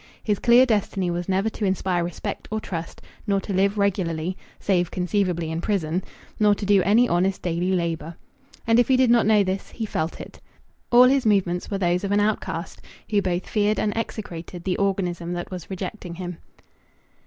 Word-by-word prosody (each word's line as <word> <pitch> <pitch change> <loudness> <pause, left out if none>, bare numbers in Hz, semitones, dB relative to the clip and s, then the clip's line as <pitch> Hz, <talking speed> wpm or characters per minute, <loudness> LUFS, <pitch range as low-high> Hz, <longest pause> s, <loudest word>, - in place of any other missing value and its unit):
His 210 -3 0
clear 245 +2 +6
destiny 200 -5 0
was 175 +2 -3
never 190 +3 +1
to 215 - -6
inspire 190 -2 0
respect 170 -1 -5
or 220 - -2
trust, 170 -5 -6 0.2
nor 200 -1 +2
to 200 - -5
live 200 +2 +2
regularly 185 -4 0 0.2
(save 180 -3 +1
conceivably 180 -3 -1
in 165 +1 -3
prison), 180 -3 -1 0.4
nor 210 -1 +5
to 205 - -5
do 200 -1 +4
any 225 +6 +4
honest 185 +1 0
daily 175 +1 0
labour. 170 -2 -2 0.5
And 230 +1 +4
if 245 - +4
he 260 - +4
did 255 -2 +4
not 235 -3 +4
know 215 -2 +5
this, 190 0 -3
he 225 - -5
felt 160 -5 -3
it. - - -11 0.5
All 245 +1 +8
his 255 -1 +4
movements 180 -4 +1
were 200 - -1
those 180 0 +1
of 200 - -2
an 205 - +3
outcast 190 -5 -2 0.3
who 205 -1 +3
both 180 -1 -2
feared 210 0 +1
and 210 - 0
execrated 180 -6 -5
the 185 -1 -1
organism 180 -3 -1
that 175 +1 -5
was 180 -3 -7
rejecting 185 -2 -6
him. 180 -1 -6
190 Hz, 190 wpm, -24 LUFS, 175-210 Hz, 0.5 s, All